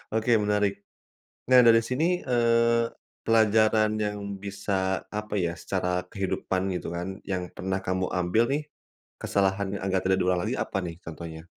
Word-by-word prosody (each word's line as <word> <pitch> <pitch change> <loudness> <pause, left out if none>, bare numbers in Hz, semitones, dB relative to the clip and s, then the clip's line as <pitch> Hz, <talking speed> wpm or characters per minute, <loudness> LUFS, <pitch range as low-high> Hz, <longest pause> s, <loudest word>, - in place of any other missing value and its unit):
Oke 110 +2 +1
menarik! 105 -1 +1 0.8
Nah 130 -1 +8
dari 115 0 +7
sini, 140 +6 +1 0.2
eee, 115 -1 +3 0.4
pelajaran 110 -1 +4
yang 105 0 -3 0.2
bisa, 95 -1 -2
apa 105 0 -4
ya, 85 -2 0
secara 90 -1 -1
kehidupan 95 -1 -2 0.2
gitu - - -6
kan, 90 +3 -4
yang 90 -2 -3
pernah 95 +1 -2
kamu 95 0 0
ambil 90 +5 +2
nih, 150 +1 -1 0.6
kesalahan 100 0 +1
yang 100 - -4
agar 95 -1 +1
tidak 95 0 +3
diulang 90 -1 +1
lagi - - -1
apa - - -2
nih 85 -1 -6
contohnya? 80 0 -8
100 Hz, 150 wpm, -27 LUFS, 90-110 Hz, 0.8 s, Nah